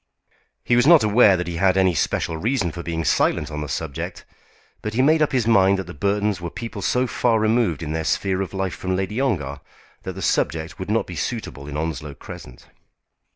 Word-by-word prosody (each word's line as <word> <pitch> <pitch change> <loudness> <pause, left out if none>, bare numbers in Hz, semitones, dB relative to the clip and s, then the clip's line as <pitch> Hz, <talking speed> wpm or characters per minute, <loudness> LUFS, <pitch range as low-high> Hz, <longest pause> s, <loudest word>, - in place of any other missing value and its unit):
He 120 - +2
was 120 +3 +4
not 170 -5 +7
aware 105 -2 +5
that 90 - -2
he 85 -1 -4
had 95 +1 +3
any 95 -2 +4
special 80 +1 -1
reason 100 0 0
for 85 - -6
being 80 -1 -3
silent - - +1
on 75 0 -4
the 75 - -5
subject, 70 +2 -5 0.6
but 105 0 -4
he 130 - +3
made 155 +3 +4
up 150 - +2
his 125 -4 +1
mind 100 -4 +4
that 95 - -4
the 90 - -9
Burtons 100 +3 0
were 85 - -4
people 115 +5 -7
so 125 +1 +1
far 120 -2 +1
removed 110 -7 +1
in 75 - -4
their 80 0 -2
sphere 95 +4 0
of 95 - -4
life 95 -2 -2
from 95 0 -2
Lady 95 +6 -2
Ongar, 75 - -1 0.4
that - - -5
the - - -7
subject 80 +1 -1
would - - -5
not - - +1
be - - -8
suitable 70 0 -4
in 75 0 -5
Onslow 75 -2 -4
Crescent. 60 -1 -11
95 Hz, 215 wpm, -22 LUFS, 80-110 Hz, 0.6 s, not